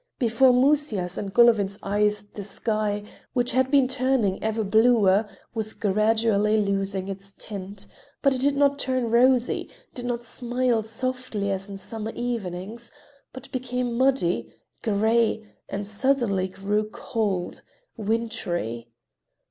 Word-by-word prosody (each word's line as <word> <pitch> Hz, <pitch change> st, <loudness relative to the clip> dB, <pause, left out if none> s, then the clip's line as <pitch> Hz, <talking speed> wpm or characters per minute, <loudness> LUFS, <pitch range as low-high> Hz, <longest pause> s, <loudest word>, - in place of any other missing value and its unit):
Before 250 Hz, 0 st, +4 dB
Musya's 250 Hz, -9 st, +2 dB
and 195 Hz, -, -4 dB
Golovin's 210 Hz, -3 st, +4 dB
eyes 210 Hz, +1 st, +1 dB
the 205 Hz, 0 st, -9 dB
sky, 210 Hz, +1 st, -2 dB, 0.3 s
which 245 Hz, -1 st, +1 dB
had 260 Hz, +1 st, +2 dB
been 275 Hz, -2 st, +4 dB
turning 255 Hz, -6 st, +1 dB
ever 220 Hz, 0 st, 0 dB
bluer, 215 Hz, -1 st, +4 dB, 0.2 s
was 220 Hz, -2 st, -3 dB
gradually 215 Hz, +1 st, +2 dB
losing 195 Hz, -1 st, -1 dB
its 195 Hz, 0 st, -8 dB
tint, 200 Hz, -1 st, -8 dB, 0.4 s
but 275 Hz, -1 st, +4 dB
it 255 Hz, -, -3 dB
did 280 Hz, +1 st, +3 dB
not 285 Hz, 0 st, +3 dB
turn 255 Hz, -4 st, 0 dB
rosy, 250 Hz, +1 st, +3 dB, 0.2 s
did 245 Hz, -1 st, -5 dB
not 240 Hz, -1 st, -2 dB
smile 240 Hz, 0 st, 0 dB
softly 225 Hz, -2 st, -3 dB
as 195 Hz, +1 st, -3 dB
in 200 Hz, -, -6 dB
summer 220 Hz, +2 st, -6 dB
evenings, 230 Hz, -1 st, -4 dB, 0.4 s
but 260 Hz, -, -11 dB
became 250 Hz, -1 st, -2 dB
muddy, 260 Hz, -8 st, +1 dB, 0.3 s
gray, 220 Hz, +1 st, +2 dB, 0.2 s
and 200 Hz, +1 st, -3 dB
suddenly 210 Hz, -3 st, +1 dB
grew 205 Hz, +3 st, -2 dB
cold, 200 Hz, -7 st, -2 dB, 0.3 s
wintry. 200 Hz, -, -2 dB
220 Hz, 125 wpm, -25 LUFS, 200-245 Hz, 0.4 s, Before